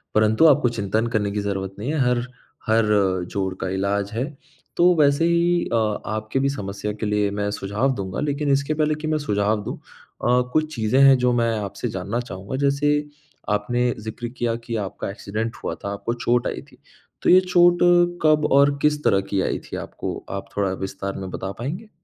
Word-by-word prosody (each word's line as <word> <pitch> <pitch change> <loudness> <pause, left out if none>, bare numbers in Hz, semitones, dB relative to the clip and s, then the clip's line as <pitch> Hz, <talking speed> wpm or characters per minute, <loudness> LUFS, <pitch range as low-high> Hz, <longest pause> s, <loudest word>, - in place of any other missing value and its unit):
परंतु 110 +8 +4
आपको 135 -4 +4
चिंतन 110 0 -1
करने 105 -3 0
की 105 - -2
ज़रूरत 95 -1 -3
नहीं 125 +7 -2
है, 155 - 0
हर 120 -1 0 0.4
हर 110 0 +3 0.5
जोड़ 95 -2 -2
का - - -1
इलाज 100 +1 -1
है। 120 +3 -1 0.5
तो 175 +1 +6
वैसे 145 +1 +3
ही 170 +1 +2
अ, - - +3 0.3
आपके 110 +4 -2
भी 140 +1 +2
समस्या 105 -5 -4
के - - 0
लिए 105 -1 +1
मैं 100 0 -2
सुझाव 105 +7 -1
दूँगा, 95 -1 -4
लेकिन 145 -1 -1
इसके 140 +2 +1
पहले 155 0 +1
कि 155 - -3
मैं 155 0 +1
सुझाव 105 -6 0
दूँ - - -5
अ, 125 +1 -2
कुछ 155 0 +1
चीज़ें 115 +3 +1
हैं, 135 -1 +7
जो 125 0 +2
मैं 115 -1 +1
आपसे 100 +5 -4
जानना 100 +4 -3
चाहूँगा। 100 -1 -6
जैसे 145 +1 +2 0.5
आपने 120 +4 +1
ज़िक्र 110 +2 -6
किया 115 -1 0
कि 115 -1 -3
आपका 100 -2 -4
एक्सीडेंट 110 +3 -4
हुआ - - -2
था, 100 - -6
आपको 115 +3 -3
चोट 120 0 0
आई - - -4
थी, - - -20 0.4
तो - - +2
ये 185 - +8
चोट 175 -1 +4 0.5
कब 155 -1 +4
और 140 +1 +5
किस 150 0 +1
तरह 95 - +3
की 95 -1 +1
आई - - -1
थी - - -3
आपको? - - -5
आप - - -4
थोड़ा 100 -2 +1
विस्तार 95 0 -4
में 95 -1 -5
बता 95 +1 -4
पाएँगे? 170 - -5
115 Hz, 195 wpm, -23 LUFS, 100-140 Hz, 0.5 s, ये